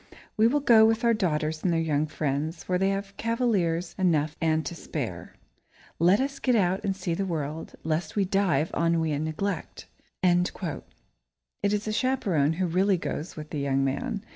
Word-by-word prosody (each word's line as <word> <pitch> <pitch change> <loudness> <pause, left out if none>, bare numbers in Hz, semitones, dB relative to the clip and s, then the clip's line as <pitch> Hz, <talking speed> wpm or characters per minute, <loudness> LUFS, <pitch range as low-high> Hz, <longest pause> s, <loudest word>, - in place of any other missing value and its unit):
We 220 +1 +5
will 290 +5 +1
go 230 -5 +6
with 225 +2 +3
our 235 0 +4
daughters 155 -6 -1
and 180 - +1
their 165 - +2
young 155 -2 0
friends, 155 +2 -2
for 180 -1 0
they 195 +1 +2
have 195 0 -3
cavaliers 200 -8 0
enough 155 -5 +2
and 160 -1 +1
to 170 - -4
spare. 170 - -6 0.6
Let 180 +6 +5
us 275 +1 -2
get 250 -2 +2
out 190 -3 +1
and 195 -2 -1
see 180 -3 -3
the 195 - -1
world, 160 -3 -4
lest 155 +1 -2
we 200 -2 +2
die 195 -5 +2
of - - -16
ennui 165 -1 +1
and 150 +1 -1
neglect!" 195 +6 -4 0.4
It 180 -1 0 0.9
is 210 +1 -1
the 215 - -2
chaperone 215 - +1
who 185 +3 -1
really 185 +3 +2
goes 165 0 -5
with 155 -1 -8
the 150 - -3
young 135 -1 +1
man. 165 +10 -2
175 Hz, 185 wpm, -27 LUFS, 155-200 Hz, 0.9 s, go